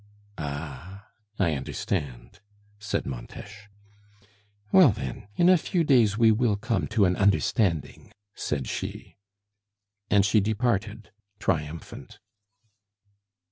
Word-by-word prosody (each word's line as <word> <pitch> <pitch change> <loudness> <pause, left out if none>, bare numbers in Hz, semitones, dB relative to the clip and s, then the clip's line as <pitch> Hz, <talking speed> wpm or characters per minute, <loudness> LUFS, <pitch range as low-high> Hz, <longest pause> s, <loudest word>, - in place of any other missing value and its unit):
"Ah! 75 - -7 0.3
I 85 -5 +1
understand," 65 -3 -4 0.4
said 105 -1 -2
Montes. 65 - -8 1.2
"Well, 185 -7 +7
then, 105 -1 -5
in 175 - +3
a 185 -2 +6
few 170 +1 0
days 120 -8 +3
we 115 -1 +5
will 110 -1 +2
come 110 +3 -2
to 110 -3 +2
an 90 0 +2
understanding," 100 - 0 0.2
said 70 -4 -3
she. - - -6 0.9
And 100 -2 +4
she 105 +1 +4
departed 110 0 -1 0.3
triumphant. 80 -3 -4
100 Hz, 100 wpm, -26 LUFS, 80-110 Hz, 1.2 s, Well